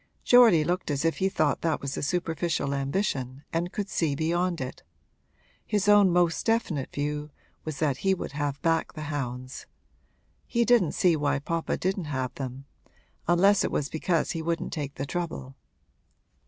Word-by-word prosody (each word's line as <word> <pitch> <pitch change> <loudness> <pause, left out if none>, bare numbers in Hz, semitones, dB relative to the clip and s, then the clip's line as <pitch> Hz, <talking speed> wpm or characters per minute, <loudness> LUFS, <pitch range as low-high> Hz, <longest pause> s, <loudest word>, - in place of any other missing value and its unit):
Geordie 230 -10 +7
looked 175 +2 -1
as 145 +1 -1
if 165 - +1
he 190 - +1
thought 155 -6 +1
that 165 -3 -1
a 140 0 -3
superficial 165 -2 -1
ambition 140 -2 -2
and 170 +2 -1
could 205 -2 -3
see 160 -7 0
beyond 170 +3 0
it; 130 0 -6 0.8
his 205 -1 -1
own 205 -2 +7
most 175 -1 +2
definite 205 - 0
view 150 +1 -3 0.4
was 155 -3 -4
that 145 -4 0
he 190 +4 +2
would - - -6
have 145 -1 -2
back 165 -1 +1
the 155 - -6
hounds. 130 -2 -5 0.8
He 235 -1 +1
didn't 230 -10 +4
see 175 -3 +3
why 145 -2 +1
papa 165 +4 -2
didn't 190 -1 -1
have 130 -4 -3
them 135 0 -6 0.6
unless 190 +4 +4
it - - 0
was 140 -1 -1
because 165 +1 0
he 165 - -3
wouldn't 165 +1 -2
take 145 -3 -4
the 135 - -3
trouble. 150 -5 -4
160 Hz, 165 wpm, -27 LUFS, 140-180 Hz, 0.8 s, Geordie